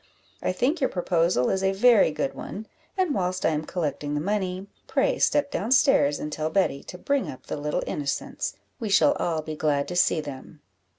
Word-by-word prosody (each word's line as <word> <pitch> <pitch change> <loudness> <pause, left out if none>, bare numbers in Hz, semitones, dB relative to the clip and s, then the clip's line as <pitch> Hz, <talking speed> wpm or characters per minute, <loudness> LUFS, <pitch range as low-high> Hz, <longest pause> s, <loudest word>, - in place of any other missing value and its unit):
I - - 0
think 260 - 0
your 265 - +2
proposal 170 -7 +1
is 190 - 0
a 190 0 +2
very 225 -1 +5
good 215 - -2
one; 215 +3 -7 0.3
and 370 -6 +1
whilst 185 -3 -1
I - - +5
am 155 0 -2
collecting 150 -4 -3
the - - 0
money, 190 +1 -2 0.2
pray - - +1
step 290 -1 +2
down 220 +5 -2
stairs, 260 - +4
and 150 - -5
tell 155 0 -2
Betty 160 -5 +1
to 180 - -8
bring 280 +8 -1
up 130 - -10
the - - -4
little 150 0 -2
innocents 140 -2 -3 0.2
we 225 -4 -3
shall 245 +9 +5
all 160 -2 -1
be 155 0 -5
glad 145 -2 0
to 180 - -4
see 175 -2 +3
them." 145 0 -8
180 Hz, 200 wpm, -25 LUFS, 150-210 Hz, 0.3 s, very